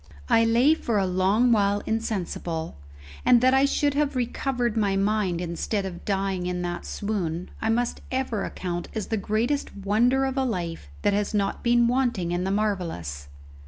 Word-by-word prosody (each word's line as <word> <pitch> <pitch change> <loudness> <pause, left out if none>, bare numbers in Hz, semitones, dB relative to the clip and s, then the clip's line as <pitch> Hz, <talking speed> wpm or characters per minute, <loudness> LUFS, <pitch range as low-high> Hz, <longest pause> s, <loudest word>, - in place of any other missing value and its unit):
I 230 - +5
lay 240 +7 +5
for 235 -8 -1
a 195 - +2
long 190 +6 +2
while 205 -2 +2
insensible; 180 - -3 0.5
and 245 - +6
that 255 +1 +4
I 270 +1 +5
should 285 0 +1
have 290 -1 0
recovered 245 -1 -1
my 205 -3 +1
mind 195 -3 +1
instead 180 +4 -2
of 175 -2 -7
dying 195 -2 -1
in 180 0 -2
that 175 0 -4
swoon 180 -5 -3
I 220 - 0
must 235 +1 0
ever 255 -6 -1
account 175 -2 -4
as 215 -3 -3
the 225 - 0
greatest 225 +8 -1
wonder 235 +7 +2
of 265 0 -3
a 265 - +2
life 170 - -3
that 205 - +3
has 205 +1 0
not 200 -1 0
been 240 0 +4
wanting 240 -8 0
in 175 +1 -1
the - - 0
marvellous. 175 - -2
210 Hz, 175 wpm, -25 LUFS, 180-240 Hz, 0.5 s, and